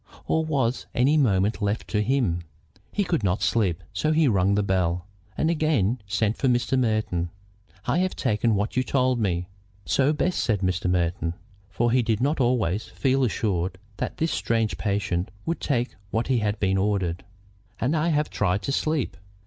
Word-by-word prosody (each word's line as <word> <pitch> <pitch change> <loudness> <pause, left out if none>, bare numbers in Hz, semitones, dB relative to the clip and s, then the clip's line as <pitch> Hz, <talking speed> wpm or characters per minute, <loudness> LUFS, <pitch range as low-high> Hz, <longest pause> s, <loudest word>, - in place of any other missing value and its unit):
Or 160 - +1
was 130 -6 0
any 135 +5 +4
moment 105 -6 +2
left 105 +2 -1
to 105 - +1
him? 105 -7 +1 0.5
He 205 - 0
could 170 - -1
not 90 0 +1
sleep, 90 -7 +1
so 155 - 0
he 155 -1 +4
rung 100 -3 +3
his 105 0 +1
bell, 90 -2 0 0.3
and - - +1
again 130 - +1
sent 105 +2 0
for 135 - +1
Mr. 125 +1 +2
Merton. 110 -8 0 0.6
"I - - +1
have 185 0 0
taken 110 +1 +1
what 105 +2 -1
you 130 - +3
told 130 -1 +1
me." 90 -4 0 0.4
"So 140 +2 +3
best," 175 +4 0
said 105 -5 +1
Mr. 90 -1 0
Merton. 85 -1 0 0.3
For 120 +4 +1
he 125 +1 +4
did 110 -2 0
not 145 +4 +1
always 115 -6 +1
feel 135 0 +1
assured 95 -6 -1 0.2
that - - -3
this 160 +1 0
strange 115 -2 0
patient 100 -4 -1 0.2
would 165 -1 -1
take 125 -3 0 0.2
what 115 +5 -1
had 105 -5 +1
been 95 -1 +2
ordered. 95 -4 0 0.6
"And 135 +7 +1
I 155 +1 +1
have 150 -2 +1
tried 100 0 0
to - - -1
sleep." 155 -1 0
110 Hz, 175 wpm, -25 LUFS, 95-135 Hz, 0.6 s, any